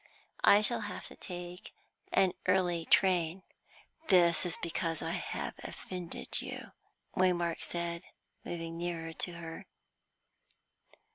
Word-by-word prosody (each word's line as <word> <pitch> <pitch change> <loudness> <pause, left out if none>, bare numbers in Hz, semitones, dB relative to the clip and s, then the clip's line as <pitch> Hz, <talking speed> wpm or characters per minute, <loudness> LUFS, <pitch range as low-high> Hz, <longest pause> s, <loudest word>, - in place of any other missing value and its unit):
I 205 - +8
shall 230 +2 +2
have - - -6
to - - -12
take 180 0 -7 0.4
an 190 - +4
early 180 -3 +3
train." 180 -1 +3 0.6
"This 175 -2 +5
is 175 - +2
because 165 -1 -1
I - - -1
have - - -3
offended 180 -2 -4
you," - - -7 0.4
Waymark 175 -2 +2
said, 170 -1 -1 0.4
moving 165 -1 -5
nearer 165 -2 -3
to 175 - -1
her. 165 -1 -8
175 Hz, 115 wpm, -33 LUFS, 170-185 Hz, 0.6 s, I